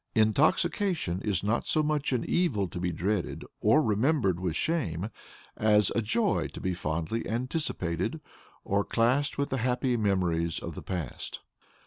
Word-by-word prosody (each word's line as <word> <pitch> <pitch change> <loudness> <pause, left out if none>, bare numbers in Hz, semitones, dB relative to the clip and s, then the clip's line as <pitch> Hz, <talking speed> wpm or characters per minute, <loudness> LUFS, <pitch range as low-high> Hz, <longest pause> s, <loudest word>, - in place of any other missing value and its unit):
Intoxication 135 - +2
is 100 -5 -1
not 110 +4 0
so 155 - +3
much 150 -2 0
an 125 -3 0
evil 120 - +1
to 90 - -6
be 90 0 -1
dreaded 95 +3 -2
or 145 +9 +4
remembered 110 - +2
with 90 -3 -2
shame, 110 - -1 0.4
as 105 -2 +3
a 115 - +2
joy 200 - +1
to - - -7
be 95 - -1
fondly 85 +6 -2
anticipated, 115 - -1 0.4
or 100 +1 +1
classed 125 +7 +1
with 140 0 0
the 135 - 0
happy 125 +1 +1
memories 90 -6 +1
of - - -5
the - - -7
past. 85 -9 -5
110 Hz, 150 wpm, -29 LUFS, 90-135 Hz, 0.4 s, or